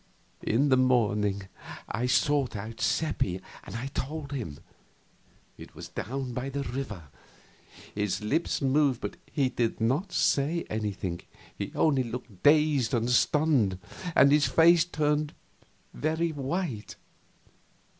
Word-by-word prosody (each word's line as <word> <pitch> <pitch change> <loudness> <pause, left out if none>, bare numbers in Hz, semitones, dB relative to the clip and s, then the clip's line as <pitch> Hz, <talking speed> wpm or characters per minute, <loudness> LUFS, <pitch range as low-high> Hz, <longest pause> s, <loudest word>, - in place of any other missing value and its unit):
In 135 +6 +2
the 130 - +5
morning 105 -6 +2 0.4
I 120 +4 -2
sought 140 0 +2
out 110 +3 -6
Seppi 145 - 0 0.2
and - - -9 0.2
told 145 +1 -4
him. 110 - -4 1.0
It - - -12
was - - -9
down 130 0 -4
by 125 +3 -3
the 140 0 -3
river. 115 - -5 0.8
His 105 -2 -1
lips 140 +8 -1
moved, 135 -2 +3
but - - -5
he 140 -4 +2
did 120 -2 -1
not 130 - 0
say 155 +5 +1
anything, 100 -5 -3 0.3
he - - -5
only 145 -5 +3
looked 120 -5 -7
dazed 145 -4 +4
and 120 +1 0
stunned, 130 - +3 0.4
and 140 +1 +7
his 145 -1 +4
face 165 +4 +5
turned 150 -3 0 0.6
very 160 +2 0
white. 140 - -3
130 Hz, 125 wpm, -28 LUFS, 110-150 Hz, 1.0 s, and